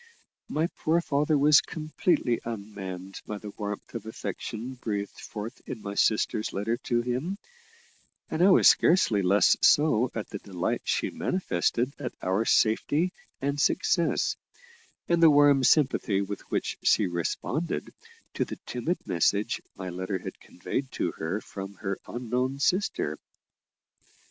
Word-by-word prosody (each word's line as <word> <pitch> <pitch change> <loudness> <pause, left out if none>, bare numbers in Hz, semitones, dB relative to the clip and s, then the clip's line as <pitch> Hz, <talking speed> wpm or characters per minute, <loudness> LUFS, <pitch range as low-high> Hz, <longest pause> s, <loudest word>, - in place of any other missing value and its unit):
My 155 +2 +1
poor 165 +2 +2
father 150 -1 +1
was 145 +1 +6
completely 155 -5 0
unmanned 100 -4 -7
by 105 - -4
the 105 0 -8
warmth 105 -1 -6
of 110 -2 -6
affection 115 +2 -5
breathed 105 -5 -4
forth 110 +4 -7
in 115 - -5
my 100 -1 -6
sister's 105 +1 +1
letter 110 +4 -1
to 120 -1 +1
him, 130 +11 -2 0.9
and 160 - -2
I 190 - +7
was 185 - +6
scarcely 115 - +4
less 95 +1 +4
so 130 -5 +4
at 110 - -3
the 100 - -5
delight 95 -4 -2
she - - 0
manifested 125 - -1
at 130 - -5
our 95 +5 0
safety 145 +13 +2 0.3
and 140 +1 0
success, 185 - +1 0.7
and 170 -1 +2
the 165 - +9
warm 145 -2 +5
sympathy 130 -7 +3
with 100 0 -4
which - - -2
she 105 - +4
responded 95 - -2 0.4
to - - 0
the - - -7
timid 145 +9 -2
message 100 +6 +1
my 95 -1 -6
letter 95 +2 -3
had 90 - -8
conveyed 130 +9 -5
to 85 - -1
her 85 +7 -2
from 95 0 -8
her 95 0 -4
unknown 125 +2 -2
sister. 185 +8 0
115 Hz, 140 wpm, -27 LUFS, 100-145 Hz, 0.9 s, the